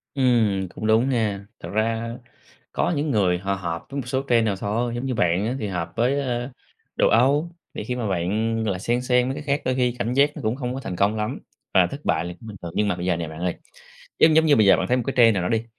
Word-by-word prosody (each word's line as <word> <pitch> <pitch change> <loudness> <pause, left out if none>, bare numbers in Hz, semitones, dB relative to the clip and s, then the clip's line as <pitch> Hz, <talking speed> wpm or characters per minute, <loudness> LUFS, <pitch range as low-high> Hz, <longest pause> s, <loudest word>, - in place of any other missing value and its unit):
Ừm, 115 -8 +2
cũng 110 - -3
đúng 110 +4 +3
nha. 105 -6 -1
Thật - - -8
ra 115 +2 -1 0.6
có - - 0
những 145 +1 -1
người 95 -6 +2
họ 100 +2 -2
hợp 85 -3 -4
với 140 0 -3
một 125 - -11
số 130 +2 -1
trend 115 -2 +4
nào 105 -3 0
thôi, 115 +5 -2
giống 120 +2 -3
như 130 - -1
bạn 90 0 +1
á 125 - -2
thì 105 - -3
hợp 85 -3 -4
với, 125 +5 +1
ơ, 125 -2 -2 0.5
đồ - - +3
Âu, 140 +8 +3 0.2
thì - - -5
khi 125 - -3
mà 120 -3 -2
bạn, 100 +5 0
gọi 105 -3 0
là, 90 - -5
xen 120 +5 0
xen 125 0 +2
mấy 135 - -2
cái - - -6
khác 145 0 0
đôi 130 0 +1
khi 125 -2 +1
cảm 115 +4 -1
giác 140 +3 +4
nó - - -7
cũng 110 +1 -1
hông 125 -2 -4
có 130 - -4
thành 95 -9 -5
công 100 +4 +2
lắm, 105 0 -3 0.3
và 90 -2 +5
thất 140 +8 -8
bại 80 - +1
là 90 - -5
cũng 115 - -12
bình 105 -2 -8
thường. 85 - -6
Nhưng 105 - +1
mà 100 - 0
bây 90 0 -5
giờ 90 -1 +2
nè 85 -1 -4
bạn 80 +1 -9
ơi, 90 0 -1 0.6
giống 155 -1 +6
giống 160 0 +5
như 150 -2 +5
bây 110 - +4
giờ 100 - +6
bạn 95 - -1
thấy 125 - +2
một 125 - -1
cái 135 - 0
trend 115 -2 +7
nào 90 - 0
đó 90 - -1
đi, 115 0 +1
115 Hz, 290 wpm, -23 LUFS, 95-125 Hz, 0.6 s, trend